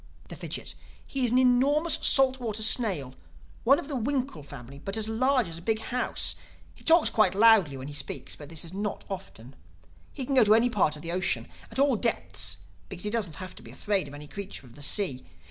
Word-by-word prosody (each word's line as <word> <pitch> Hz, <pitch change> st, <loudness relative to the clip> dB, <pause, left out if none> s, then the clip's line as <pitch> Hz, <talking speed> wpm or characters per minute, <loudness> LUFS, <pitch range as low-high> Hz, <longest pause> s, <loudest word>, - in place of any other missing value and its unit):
The -, -, -7 dB
Fidgit: -, -, -6 dB, 0.3 s
"He 270 Hz, -2 st, -1 dB
is -, -, +3 dB
an 245 Hz, -, +2 dB
enormous 270 Hz, +6 st, +3 dB
salt 265 Hz, -1 st, +4 dB
water 220 Hz, -3 st, -3 dB
snail, 195 Hz, -, +2 dB, 0.5 s
one 275 Hz, +4 st, +5 dB
of -, -, -6 dB
the 290 Hz, -, -4 dB
winkle 260 Hz, -, -2 dB
family, 140 Hz, -1 st, -11 dB
but 195 Hz, +7 st, -5 dB
as 220 Hz, -1 st, -2 dB
large 250 Hz, +1 st, +2 dB
as 165 Hz, 0 st, -8 dB
a -, -, -13 dB
big 220 Hz, +5 st, 0 dB
house. 245 Hz, +3 st, -1 dB, 0.4 s
He -, -, -19 dB
talks 330 Hz, 0 st, +6 dB
quite 215 Hz, -4 st, +3 dB
loudly—when 195 Hz, -12 st, +4 dB
he 145 Hz, -, -7 dB
speaks, 145 Hz, -, -6 dB
but 145 Hz, -1 st, -11 dB
this 165 Hz, 0 st, -3 dB
is 170 Hz, -, -10 dB
not 205 Hz, +1 st, -4 dB
often. 135 Hz, -10 st, -8 dB, 0.6 s
He 265 Hz, -, -5 dB
can 275 Hz, -, -2 dB
go 255 Hz, -3 st, +6 dB
to 215 Hz, 0 st, +5 dB
any 240 Hz, +2 st, +3 dB
part 180 Hz, -8 st, +2 dB
of 150 Hz, -, -11 dB
the 170 Hz, -, -4 dB
ocean, 185 Hz, +2 st, 0 dB, 0.2 s
at -, -, -10 dB
all 275 Hz, -1 st, +3 dB
depths 95 Hz, -, -1 dB, 0.3 s
because 175 Hz, -, -6 dB
he 210 Hz, -, -1 dB
doesn't 205 Hz, -9 st, -2 dB
have 185 Hz, +2 st, -8 dB
to -, -, -12 dB
be -, -, -13 dB
afraid 200 Hz, -6 st, -1 dB
of 140 Hz, -, -10 dB
any 150 Hz, 0 st, -10 dB
creature 200 Hz, -4 st, -8 dB
in 120 Hz, -, -16 dB
the 145 Hz, -, -13 dB
sea. 145 Hz, -3 st, 0 dB
210 Hz, 220 wpm, -27 LUFS, 150-250 Hz, 0.6 s, talks